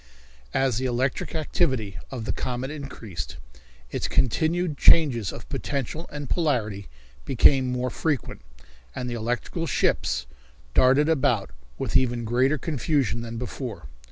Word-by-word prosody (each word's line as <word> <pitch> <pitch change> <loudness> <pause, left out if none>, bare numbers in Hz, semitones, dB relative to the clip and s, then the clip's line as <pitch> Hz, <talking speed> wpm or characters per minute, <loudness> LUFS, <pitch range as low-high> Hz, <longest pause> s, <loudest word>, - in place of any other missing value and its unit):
As 130 -4 +2
the 130 - 0
electric 130 +5 -1
activity 130 - 0
of 120 -4 -5
the - - 0
comet 130 +2 -3
increased, 115 - -6 0.5
its - - -1
continued 160 +6 +1
changes 130 - +5
of - - -9
potential 150 +4 -3
and 145 -1 -5
polarity 115 - 0 0.4
became 130 0 +4
more 125 0 -1
frequent, 150 -5 -2 0.5
and 125 - -3
the 120 - -3
electrical 120 +8 -2
ships 60 - +1 0.5
darted 135 +4 +5
about 125 - +2 0.3
with - - -3
even 120 -2 +2
greater 130 +6 +2
confusion 135 - 0
than 115 0 -6
before. 120 - -5
130 Hz, 130 wpm, -25 LUFS, 120-145 Hz, 0.5 s, changes